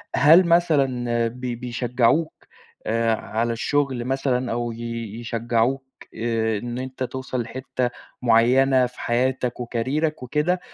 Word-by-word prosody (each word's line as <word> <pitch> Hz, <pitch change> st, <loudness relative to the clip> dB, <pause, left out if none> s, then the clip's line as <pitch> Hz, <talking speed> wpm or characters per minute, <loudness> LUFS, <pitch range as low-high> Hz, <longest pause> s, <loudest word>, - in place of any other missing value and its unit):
هل 165 Hz, +5 st, +6 dB
مثلًا 135 Hz, -9 st, +2 dB
بي 125 Hz, +1 st, -5 dB
بيشجّعوك 125 Hz, +5 st, 0 dB, 0.5 s
آآ، 115 Hz, 0 st, +1 dB
على 115 Hz, +2 st, -2 dB
الشغل 130 Hz, 0 st, -1 dB
مثلًا 130 Hz, -1 st, 0 dB
أو 120 Hz, 0 st, -2 dB
ي 115 Hz, +1 st, -8 dB, 0.4 s
يشجّعوك 120 Hz, +3 st, 0 dB, 0.3 s
آآ، 110 Hz, -1 st, 0 dB
إن 120 Hz, +3 st, -5 dB
أنت 130 Hz, 0 st, -5 dB
توصل 130 Hz, 0 st, -3 dB
لحتة 130 Hz, +1 st, -3 dB, 0.3 s
معيّنة 125 Hz, +3 st, +4 dB
في 125 Hz, 0 st, -9 dB
حياتك 125 Hz, +1 st, 0 dB
وكاريرك 130 Hz, +6 st, -2 dB
وكده 150 Hz, +8 st, 0 dB
125 Hz, 115 wpm, -23 LUFS, 120-135 Hz, 0.5 s, هل